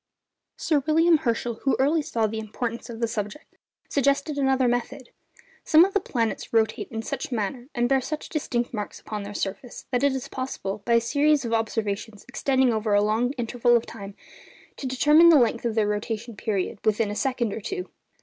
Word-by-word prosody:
Sir 305 Hz, -3 st, +1 dB
William 325 Hz, +1 st, +5 dB
Herschel, 235 Hz, -4 st, -2 dB
who 270 Hz, -, +2 dB
early 300 Hz, +4 st, +2 dB
saw 230 Hz, -6 st, -1 dB
the 220 Hz, +1 st, -3 dB
importance 230 Hz, +2 st, -5 dB
of 230 Hz, 0 st, -8 dB
the 230 Hz, -, +2 dB
subject, 220 Hz, +5 st, -6 dB, 0.3 s
suggested 280 Hz, +2 st, +1 dB
another 265 Hz, -2 st, +2 dB
method. 245 Hz, +2 st, -2 dB, 0.5 s
Some 320 Hz, +2 st, +6 dB
of 390 Hz, -, -4 dB
the 405 Hz, -, +3 dB
planets 230 Hz, -, -2 dB
rotate 220 Hz, -1 st, +1 dB
in 225 Hz, -1 st, -5 dB
such -, -, -4 dB
a 250 Hz, -, -2 dB
manner, 235 Hz, +4 st, -3 dB
and 240 Hz, 0 st, +2 dB
bear 270 Hz, +1 st, +2 dB
such 305 Hz, +4 st, -5 dB
distinct 245 Hz, -6 st, -2 dB
marks 210 Hz, -2 st, -5 dB
upon 210 Hz, -1 st, -6 dB
their 200 Hz, +1 st, -8 dB
surface, 200 Hz, +6 st, -5 dB
that 250 Hz, +1 st, 0 dB
it 280 Hz, -1 st, +3 dB
is 265 Hz, -2 st, -4 dB
possible, 215 Hz, -6 st, -5 dB
by 235 Hz, -, +2 dB
a 230 Hz, -, +5 dB
series 285 Hz, +3 st, +2 dB
of 230 Hz, -, -2 dB
observations 220 Hz, -1 st, -2 dB
extending 265 Hz, -2 st, +1 dB
over 215 Hz, -1 st, +1 dB
a 205 Hz, -, +4 dB
long 225 Hz, +5 st, +1 dB
interval 240 Hz, -1 st, +1 dB
of 230 Hz, -, -4 dB
time, 200 Hz, -3 st, -9 dB, 0.6 s
to 270 Hz, -, -4 dB
determine 300 Hz, +6 st, +6 dB
the 325 Hz, -, +8 dB
length 235 Hz, -2 st, +2 dB
of 230 Hz, -2 st, -1 dB
their 215 Hz, -2 st, +2 dB
rotation 220 Hz, +2 st, -3 dB
period 205 Hz, 0 st, -2 dB
within 215 Hz, 0 st, +1 dB
a -, -, -4 dB
second 245 Hz, -3 st, -1 dB
or -, -, -5 dB
two. 370 Hz, -, -4 dB
240 Hz, 200 wpm, -25 LUFS, 220-270 Hz, 0.6 s, the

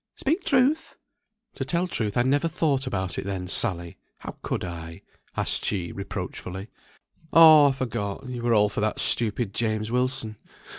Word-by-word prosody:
Speak 325 Hz, +7 st, -1 dB
truth!" 280 Hz, +5 st, +1 dB, 0.6 s
"To -, -, -4 dB
tell 170 Hz, +6 st, -1 dB
truth, 110 Hz, -, -2 dB
I 120 Hz, -, +4 dB
never 145 Hz, +5 st, +1 dB
thought 145 Hz, -4 st, 0 dB
about 95 Hz, -7 st, -3 dB
it -, -, -4 dB
then, 95 Hz, -2 st, -4 dB
Sally. 85 Hz, -2 st, +2 dB, 0.2 s
How -, -, -9 dB
could -, -, -3 dB
I?" 85 Hz, -2 st, -8 dB, 0.3 s
asked -, -, 0 dB
she, 90 Hz, -4 st, -2 dB
reproachfully. 95 Hz, 0 st, -6 dB, 0.6 s
"Oh 155 Hz, -3 st, +8 dB
I -, -, +3 dB
forgot. 120 Hz, -3 st, -4 dB
You 125 Hz, -2 st, -5 dB
were 120 Hz, -1 st, +2 dB
all 105 Hz, 0 st, +4 dB
for 105 Hz, -, -4 dB
that 110 Hz, 0 st, -1 dB
stupid 110 Hz, -2 st, 0 dB
James 110 Hz, -1 st, -2 dB
Wilson. 125 Hz, -3 st, -1 dB
115 Hz, 160 wpm, -25 LUFS, 100-140 Hz, 0.6 s, Oh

